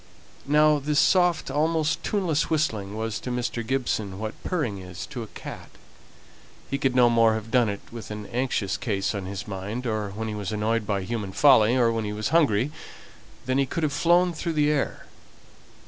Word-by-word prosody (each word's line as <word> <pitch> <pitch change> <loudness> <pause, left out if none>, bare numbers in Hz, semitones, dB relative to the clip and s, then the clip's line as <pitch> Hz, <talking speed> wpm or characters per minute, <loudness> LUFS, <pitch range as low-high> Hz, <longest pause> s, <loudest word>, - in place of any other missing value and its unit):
Now 150 +1 +4
this 145 +1 +1
soft, 175 -6 +3
almost 155 +1 +1
tuneless 175 -7 0
whistling, 110 -11 -1
was 110 -1 -3
to - - -6
Mr. 120 -1 -2
Gibson 110 -6 -2
what 110 +1 -4
purring 135 - -2
is 90 0 -7
to 130 -5 -7
a 110 - -6
cat. - - -9 1.0
He 140 - -1
could 130 -2 +1
no 125 -1 +6
more 115 -1 +4
have 110 0 -6
done 120 -4 +3
it 100 0 -4
with 115 -1 -8
an 105 -1 -6
anxious 120 -5 -1
case 100 -4 -1
on 100 -3 -4
his 100 0 -6
mind, 105 +5 -5
or 110 -3 -1
when 110 +3 -5
he 110 - -3
was 105 -2 -4
annoyed 110 +1 -1
by 100 -2 -1
human 105 -2 -4
folly, 125 -4 +5
or 120 -2 +4
when 115 -1 -1
he 105 - -3
was 105 0 -2
hungry, 145 -6 +3 0.7
than 130 +2 +1
he 135 - +2
could 165 - -3
have 150 -2 0
flown 175 +4 +3
through 165 +1 -3
the 150 -1 +2
air. 145 -3 -2
120 Hz, 195 wpm, -25 LUFS, 105-150 Hz, 1.0 s, no